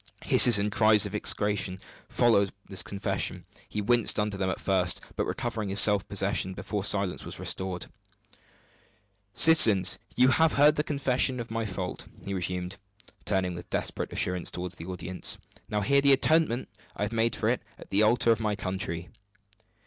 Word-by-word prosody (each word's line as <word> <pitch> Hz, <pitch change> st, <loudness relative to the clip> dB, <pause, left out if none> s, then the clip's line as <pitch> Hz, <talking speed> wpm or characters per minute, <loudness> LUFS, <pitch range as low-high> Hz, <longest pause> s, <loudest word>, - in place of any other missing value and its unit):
Hisses 120 Hz, -3 st, +6 dB
and 105 Hz, +1 st, -1 dB
cries 105 Hz, 0 st, +3 dB
of 105 Hz, -, -7 dB
execration 100 Hz, -2 st, -1 dB, 0.3 s
followed 100 Hz, -5 st, +2 dB, 0.2 s
this 95 Hz, -2 st, -5 dB
confession. 100 Hz, 0 st, -3 dB, 0.2 s
He 105 Hz, -, -4 dB
winced 120 Hz, 0 st, +3 dB
under 105 Hz, -1 st, -1 dB
them 95 Hz, -1 st, -2 dB
at -, -, -4 dB
first; 90 Hz, -2 st, +1 dB, 0.2 s
but -, -, -2 dB
recovered 115 Hz, -4 st, -4 dB
his 100 Hz, +2 st, +2 dB
self 105 Hz, -3 st, +4 dB
possession 95 Hz, -1 st, -1 dB
before 105 Hz, 0 st, -5 dB
silence 100 Hz, -2 st, 0 dB
was -, -, -9 dB
restored. 95 Hz, -2 st, -4 dB, 1.5 s
"Citizens, 110 Hz, -, +6 dB, 0.2 s
you 125 Hz, +1 st, +4 dB
have 160 Hz, +4 st, +3 dB
heard 150 Hz, +2 st, +4 dB
the 150 Hz, -, -1 dB
confession 135 Hz, -4 st, 0 dB
of 115 Hz, -1 st, -7 dB
my 115 Hz, -1 st, -3 dB
fault," 90 Hz, -2 st, -6 dB, 0.2 s
he 100 Hz, -, -4 dB
resumed, 90 Hz, +1 st, -3 dB, 0.5 s
turning 95 Hz, -3 st, -1 dB
with 85 Hz, 0 st, -10 dB
desperate -, -, -3 dB
assurance 90 Hz, -1 st, -1 dB
toward 90 Hz, 0 st, -6 dB
the 85 Hz, -1 st, -7 dB
audience; 90 Hz, 0 st, -3 dB, 0.3 s
"now 105 Hz, -1 st, -1 dB
hear 140 Hz, +7 st, +2 dB
the 140 Hz, 0 st, +5 dB
atonement 140 Hz, -3 st, +1 dB, 0.3 s
I -, -, -3 dB
have 105 Hz, -, -3 dB
made 115 Hz, +1 st, 0 dB
for -, -, -2 dB
it -, -, 0 dB, 0.2 s
at -, -, -15 dB
the 100 Hz, -, +2 dB
altar 115 Hz, +2 st, +3 dB
of 115 Hz, -, +1 dB
my 105 Hz, -2 st, -2 dB
country." 95 Hz, -3 st, -5 dB
105 Hz, 170 wpm, -27 LUFS, 95-115 Hz, 1.5 s, Hisses